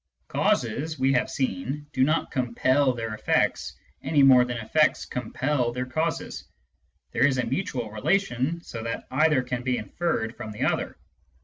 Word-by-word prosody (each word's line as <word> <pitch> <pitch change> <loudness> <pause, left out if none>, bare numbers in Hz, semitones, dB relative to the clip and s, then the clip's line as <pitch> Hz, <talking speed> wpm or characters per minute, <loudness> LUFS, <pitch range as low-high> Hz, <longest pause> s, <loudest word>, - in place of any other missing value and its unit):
Causes, 145 +7 0
we 135 +1 +2
have 125 -1 +1
seen, 135 +2 -3
do 130 - +2
not 155 +4 +1
compel 130 +2 +2
their 115 -2 -4
effects, 110 - 0 0.2
any 145 -3 +3
more 130 -2 +7
than 120 -1 -3
effects 135 +8 +2
compel 125 +1 -1
their 125 +1 -3
causes. 160 +6 -3 0.7
There - - +4
is 135 -2 0
a 130 - 0
mutual 125 - -3
relation, 160 - 0
so 115 - -7
that 115 0 -4
either 150 -1 +3
can 125 0 -3
be 125 0 0
inferred 110 - -2
from 110 -3 -7
the 105 - -3
other. - - -1
130 Hz, 155 wpm, -26 LUFS, 120-150 Hz, 0.7 s, more